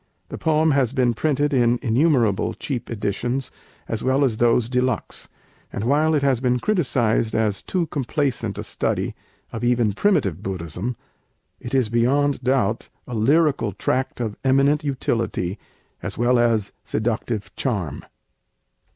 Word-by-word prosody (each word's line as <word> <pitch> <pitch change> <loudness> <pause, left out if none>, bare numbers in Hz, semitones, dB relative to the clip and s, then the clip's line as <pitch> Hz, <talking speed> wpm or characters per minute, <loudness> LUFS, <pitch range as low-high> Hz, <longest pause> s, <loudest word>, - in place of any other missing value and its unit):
The - - -6
poem 160 0 +3
has 135 -3 +2
been 125 -3 +2
printed 145 +3 0
in 120 -2 +3
innumerable 120 -4 +2
cheap 125 -4 -4
editions 120 +4 -2 0.4
as 110 -1 -3
well 130 +2 +2
as 120 -5 +1
those 120 0 +3
de 125 +1 +1
luxe; 130 -3 -2 0.4
and 100 - -4
while 150 +6 +3
it 145 - +1
has 135 -4 +2
been 125 -1 +1
criticized 125 - +1
as 110 -3 +1
too 180 -3 -1
complaisant 135 - -2
a - - -4
study - - -2 0.4
of 115 - -5
even 120 -3 +2
primitive 100 - +1
Buddhism, 95 +5 -4 0.6
it 120 +2 -4
is 130 -5 +2
beyond 135 +5 +2
doubt 125 -4 +1 0.2
a 125 - -8
lyrical 135 - +2
tract 130 +7 -1
of 110 -3 -2
eminent 135 +3 +3
utility 115 -8 -2 0.4
as - - -5
well 120 +2 +3
as 115 -4 +2
seductive 110 -3 -2
charm. 100 - -2
120 Hz, 140 wpm, -22 LUFS, 110-140 Hz, 0.6 s, poem